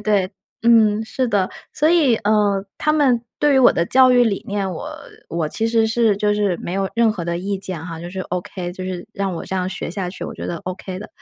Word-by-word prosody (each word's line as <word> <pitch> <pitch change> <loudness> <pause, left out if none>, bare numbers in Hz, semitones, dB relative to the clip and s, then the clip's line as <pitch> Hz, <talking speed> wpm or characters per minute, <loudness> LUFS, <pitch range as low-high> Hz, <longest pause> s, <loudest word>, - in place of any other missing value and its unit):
对， 205 -2 +1 0.3
嗯， 225 -2 +4
是 255 +3 -1
的， 200 -4 +1 0.2
所 305 - +2
以， 310 -9 +4
呃， 205 -2 +1
他 305 - +2
们 260 -6 +3 0.2
对 295 -1 +3
于 265 - +5
我 245 - +7
的 170 - 0
教 260 0 +6
育 245 -1 +5
理 205 -4 -1
念， 200 -2 -1
我 160 - -6 0.4
我 165 -2 -2
其 225 +6 -1
实 225 -1 +3
是 220 -2 +2
就 210 +1 +1
是 200 -4 +1
没 175 - -5
有 195 0 0
任 230 -2 +4
何 175 -5 -5
的 170 0 -2
意 195 +2 -2
见 185 -4 -5
哈， 165 -2 -7
就 175 +1 -7
是 190 - -7
OK， 175 0 -5
就 185 0 -7
是 185 +1 -5
让 195 -2 -2
我 - - -5
这 - - -5
样 185 0 -1
学 - - -4
下 180 0 -3
去， - - -7
我 - - -6
觉 - - -6
得 170 - -3
OK 185 0 -5
的。 210 - -8
200 Hz, 275 characters per minute, -20 LUFS, 185-225 Hz, 0.4 s, 我